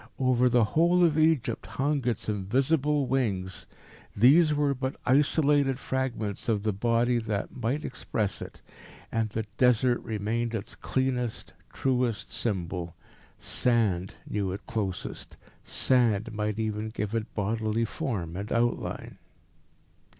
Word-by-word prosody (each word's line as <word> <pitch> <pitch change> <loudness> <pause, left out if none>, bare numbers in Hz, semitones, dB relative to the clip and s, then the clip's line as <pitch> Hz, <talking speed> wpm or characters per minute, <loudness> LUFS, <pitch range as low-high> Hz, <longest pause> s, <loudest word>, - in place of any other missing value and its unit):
Over 125 -1 +3
the 120 -1 +4
whole 170 +10 +3
of 165 -3 +4
Egypt 155 -7 +2
hung 140 -1 -1
its 120 - -1
invisible 135 +8 +1
wings. 105 -8 -1 0.5
These 150 +9 +6
were 145 -1 +2
but 130 0 -3
isolated 145 0 +3
fragments 125 -7 -3
of 105 -3 +1
the 110 -1 0
Body 120 +4 +2
that 105 -3 -3
might 130 +5 -2
express 110 -5 -3
it. - - -9 0.5
And 115 -1 0
the 110 +1 -3
Desert 125 -1 +4
remained 115 +2 -2
its 105 - -5
cleanest, 125 -3 -2 0.2
truest 125 -5 -1
symbol. 90 -5 -3 0.4
Sand 105 -7 +1
knew 100 -3 -1
it 95 - -6
closest. 100 -5 -4 0.3
Sand 115 -4 +2
might 105 0 -2
even 110 -1 -2
give 105 -1 -4
it 115 -1 -2
bodily 110 +2 0
form 95 -8 -3
and 100 +3 -5
outline. 120 0 -1
115 Hz, 125 wpm, -28 LUFS, 105-130 Hz, 0.5 s, These